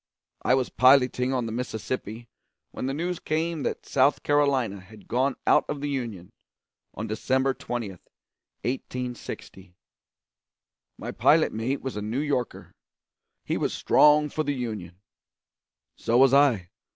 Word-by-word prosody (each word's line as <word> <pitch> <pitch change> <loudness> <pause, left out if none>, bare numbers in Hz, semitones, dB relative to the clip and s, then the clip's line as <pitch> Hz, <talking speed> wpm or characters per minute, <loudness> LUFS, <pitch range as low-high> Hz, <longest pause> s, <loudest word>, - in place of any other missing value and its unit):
I 130 - +3
was 130 -2 0
piloting 130 -1 +4
on 125 -3 0
the 115 - -4
Mississippi 115 -1 -4 0.4
when 130 - -4
the 135 - -1
news 175 +3 -2
came 160 0 -2
that - - -3
South 135 +2 +2
Carolina 140 -8 +1
had 100 +2 -16
gone 130 +2 +1
out - - +5
of 150 - -3
the 145 +1 -3
Union 115 -10 -5 0.6
on 110 - -4
December 130 +5 0
20, 120 -4 -4
1860. 120 -2 -8 1.2
My - - -6
pilot - - +3
mate 120 +5 -2
was 130 -4 -4
a 105 - -3
New 110 +4 -3
Yorker. 140 -5 -3 0.7
He - - -1
was - - -1
strong 150 0 +5
for 155 - -2
the 145 -1 -1
Union; 105 -8 -5 1.0
so 115 - +1
was 135 +1 +6
I. 130 -11 +3
125 Hz, 140 wpm, -26 LUFS, 110-140 Hz, 1.2 s, was